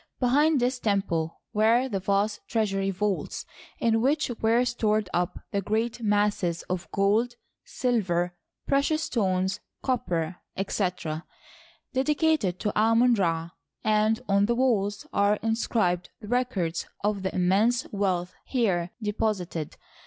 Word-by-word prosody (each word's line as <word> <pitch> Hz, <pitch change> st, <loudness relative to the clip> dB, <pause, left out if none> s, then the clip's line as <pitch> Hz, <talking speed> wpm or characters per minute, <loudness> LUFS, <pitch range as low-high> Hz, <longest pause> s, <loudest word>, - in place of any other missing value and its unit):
Behind 285 Hz, +4 st, +3 dB
this 250 Hz, +1 st, 0 dB
temple 195 Hz, -7 st, -1 dB
were 230 Hz, +4 st, +4 dB
the 200 Hz, -6 st, -2 dB
vast 200 Hz, +2 st, 0 dB
treasury 195 Hz, -4 st, 0 dB
vaults, 195 Hz, +1 st, -2 dB, 0.3 s
in 225 Hz, -1 st, +2 dB
which 285 Hz, +2 st, +1 dB
were 230 Hz, +3 st, +3 dB
stored 215 Hz, -4 st, +1 dB
up 175 Hz, 0 st, 0 dB
the 200 Hz, -, 0 dB
g^eat 220 Hz, +4 st, -1 dB
masses 205 Hz, -5 st, +1 dB
df 180 Hz, -1 st, -3 dB
gold, 215 Hz, +5 st, +2 dB, 0.3 s
silver, 180 Hz, -8 st, 0 dB, 0.3 s
precious 290 Hz, +3 st, +1 dB
stones, 190 Hz, -4 st, 0 dB, 0.2 s
copper, 180 Hz, -, -1 dB, 0.2 s
etc., 180 Hz, -5 st, -2 dB, 0.7 s
dedicated 275 Hz, -, +1 dB
to 210 Hz, -, -1 dB
Amon 230 Hz, +3 st, +4 dB
Ra, 165 Hz, -5 st, 0 dB, 0.3 s
and 215 Hz, +1 st, +2 dB
on 200 Hz, 0 st, +3 dB
the 235 Hz, -, +2 dB
walls 205 Hz, -6 st, +1 dB
are 200 Hz, +1 st, +3 dB
inscribed 220 Hz, -6 st, 0 dB
the 210 Hz, -, -10 dB
records 215 Hz, -9 st, -1 dB, 0.2 s
of 205 Hz, -1 st, 0 dB
the 190 Hz, 0 st, -2 dB
im 180 Hz, -1 st, +2 dB
mense 225 Hz, +7 st, +3 dB
wealth 185 Hz, -3 st, -1 dB
here 190 Hz, -9 st, 0 dB
deposited. 200 Hz, -7 st, -2 dB
210 Hz, 125 wpm, -27 LUFS, 185-235 Hz, 0.7 s, were